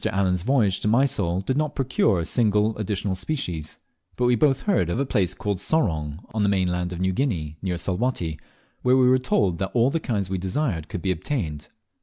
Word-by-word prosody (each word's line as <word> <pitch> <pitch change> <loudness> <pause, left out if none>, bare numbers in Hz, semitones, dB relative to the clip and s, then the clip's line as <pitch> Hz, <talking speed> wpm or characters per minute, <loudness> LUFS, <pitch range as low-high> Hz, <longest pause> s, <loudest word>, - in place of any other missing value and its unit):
Allen's 95 -2 +1
voyage 110 -4 +2
to - - -2
Mysol 105 -7 +2
did 130 +7 -1
not 150 +1 -1
procure 125 -7 +2
a 85 - -2
single 105 0 +2
additional 100 -2 -1
species, 90 - -4 0.4
but 125 - 0
we 125 - +4
both 135 +2 +2
heard 185 - +1
of 85 - -1
a 140 - +1
place 95 -8 0
called 100 -4 -2
Sorong, 85 - -1
on 110 - -1
the 100 - +3
mainland 90 -2 0
of 90 - -5
New 95 0 +1
Guinea, 80 - -2
near 90 -2 -2
Salwatty, 90 -3 -2 0.4
where 125 +1 +4
we 130 -1 +5
were 130 +1 +5
told 100 -9 +1
that 95 - -1
all 120 +3 +4
the 165 - 0
kinds 105 - -2
we 95 0 -2
desired 95 - -2
could 90 - -6
be 95 - +1
obtained. 80 - -3
100 Hz, 205 wpm, -24 LUFS, 90-125 Hz, 0.4 s, we